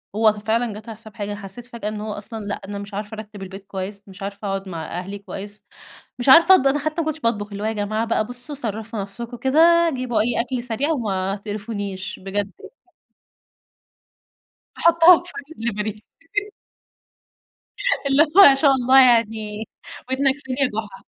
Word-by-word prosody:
هو 215 Hz, -1 st, +4 dB
ف -, -, -12 dB
فعلًا 225 Hz, +1 st, 0 dB
جات 215 Hz, +2 st, -10 dB
على 220 Hz, -, -8 dB
حساب 220 Hz, 0 st, -13 dB
حاجة، 205 Hz, -1 st, -4 dB
أنا 205 Hz, -, -5 dB
حسيت 200 Hz, +5 st, -7 dB
فجأة 235 Hz, -3 st, -7 dB
إن 210 Hz, -1 st, -5 dB
هو 215 Hz, 0 st, -4 dB
أصلًا 215 Hz, +1 st, -7 dB
لأ، 205 Hz, -, -4 dB
أنا 200 Hz, 0 st, -5 dB
مش 200 Hz, 0 st, -9 dB
عارفة 210 Hz, +2 st, -5 dB
أرتِب 210 Hz, -2 st, -9 dB
البيت 195 Hz, +1 st, -9 dB
كويس، 200 Hz, +1 st, -6 dB
مش 195 Hz, +1 st, -11 dB
عارفة 200 Hz, +1 st, -5 dB
أقعد 195 Hz, 0 st, -3 dB
مع 165 Hz, -3 st, -5 dB
أهلي 195 Hz, +2 st, -7 dB
كويس، 205 Hz, +1 st, -9 dB, 0.5 s
مش 245 Hz, +2 st, +1 dB
عارفة 335 Hz, +6 st, +9 dB
أطب 275 Hz, -5 st, +3 dB
أنا 285 Hz, +2 st, +2 dB
حتى 310 Hz, +3 st, -2 dB
ما -, -, -3 dB
كنتش 315 Hz, 0 st, -2 dB
باطبخ، 225 Hz, -6 st, -1 dB
اللي 200 Hz, +1 st, -5 dB
هو 215 Hz, -, 0 dB
"يا 220 Hz, -, -1 dB
جماعة 215 Hz, +2 st, -1 dB
بقى 225 Hz, -1 st, 0 dB
بُصوا 245 Hz, +5 st, -6 dB
صرّفوا 220 Hz, -3 st, -4 dB
نفسكم 235 Hz, +5 st, -7 dB
كده، 335 Hz, +6 st, +4 dB
جيبوا 250 Hz, -2 st, -1 dB
أي 235 Hz, +1 st, +1 dB
أكل 245 Hz, 0 st, -4 dB
سريع 250 Hz, +5 st, -1 dB
وما 195 Hz, -8 st, -1 dB
تقرفونيش." 205 Hz, -2 st, -5 dB
بجد 195 Hz, +1 st, -3 dB
يع -, -, -11 dB, 2.1 s
أحُطها 335 Hz, +1 st, +7 dB
في 360 Hz, -, -12 dB
أي 295 Hz, +3 st, -9 dB, 0.2 s
دليفري. 210 Hz, 0 st, -4 dB, 2.0 s
اللي 275 Hz, +3 st, +5 dB
هو 325 Hz, +6 st, +5 dB
ما 270 Hz, -, +5 dB
شاء 280 Hz, 0 st, +4 dB
الله 265 Hz, +1 st, +6 dB
يعني 220 Hz, -3 st, +2 dB, 0.4 s
ودنك 270 Hz, 0 st, +2 dB
منين 255 Hz, -, -2 dB
يا 270 Hz, -, +4 dB
جحا. 200 Hz, -3 st, -14 dB
220 Hz, 185 wpm, -22 LUFS, 205-255 Hz, 2.1 s, عارفة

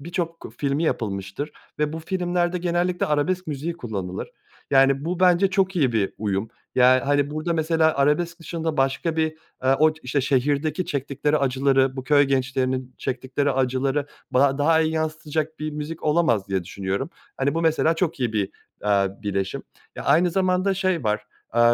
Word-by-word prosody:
birçok 165 Hz, +1 st, -4 dB
filmi 140 Hz, +2 st, 0 dB
yapılmıştır 100 Hz, -, -2 dB, 0.3 s
ve 150 Hz, 0 st, 0 dB
bu 160 Hz, -, -4 dB
filmlerde 175 Hz, 0 st, -1 dB
genellikle 175 Hz, +1 st, 0 dB
arabesk 175 Hz, +5 st, 0 dB
müziği 155 Hz, +3 st, -3 dB
kullanılır. 100 Hz, -, -5 dB, 0.4 s
Yani, 135 Hz, +1 st, +4 dB
bu 180 Hz, +2 st, -2 dB
bence 185 Hz, +1 st, +4 dB
çok 190 Hz, 0 st, +1 dB
iyi 135 Hz, -8 st, +2 dB
bir 105 Hz, -4 st, 0 dB
uyum. 105 Hz, 0 st, -1 dB, 0.3 s
Yani, 130 Hz, 0 st, +6 dB
hani, 145 Hz, +1 st, +1 dB
burada, 155 Hz, +3 st, -2 dB
mesela 160 Hz, -1 st, +2 dB
arabesk 165 Hz, +5 st, +1 dB
dışında 165 Hz, -1 st, -3 dB
başka 140 Hz, +4 st, 0 dB
bir, 160 Hz, 0 st, 0 dB, 0.3 s
eee, 130 Hz, +1 st, +5 dB
o 155 Hz, +1 st, +5 dB
işte 135 Hz, +2 st, 0 dB
şehirdeki 145 Hz, +5 st, 0 dB
çektikleri 145 Hz, +2 st, 0 dB
acıları, 135 Hz, 0 st, +2 dB
bu 130 Hz, -, -5 dB
köy 145 Hz, 0 st, +5 dB
gençlerinin 130 Hz, -1 st, -1 dB
çektikleri 135 Hz, +2 st, -1 dB
acıları 135 Hz, +2 st, 0 dB, 0.2 s
ba 135 Hz, +2 st, +3 dB
daha 160 Hz, +2 st, +4 dB
iyi 160 Hz, 0 st, +1 dB
yansıtacak 155 Hz, 0 st, -2 dB
bir 155 Hz, 0 st, -3 dB
müzik 150 Hz, +2 st, -6 dB
olamaz 150 Hz, -, +2 dB
diye 95 Hz, -2 st, -1 dB
düşünüyorum. 100 Hz, -, -3 dB, 0.3 s
Hani, 140 Hz, +2 st, 0 dB
bu 165 Hz, -, 0 dB
mesela 160 Hz, 0 st, +3 dB
çok 165 Hz, -5 st, -1 dB
iyi 120 Hz, -3 st, 0 dB
bir, 100 Hz, -3 st, 0 dB, 0.3 s
aaa, 100 Hz, 0 st, +1 dB
bileşim. 100 Hz, -2 st, -2 dB, 0.3 s
Eee, -, -, -5 dB
aynı 170 Hz, +5 st, +4 dB
zamanda 185 Hz, +1 st, +1 dB
şey 185 Hz, -6 st, 0 dB
var, 105 Hz, 0 st, 0 dB, 0.3 s
eee, 120 Hz, -, +3 dB
145 Hz, 165 wpm, -24 LUFS, 130-165 Hz, 0.4 s, Yani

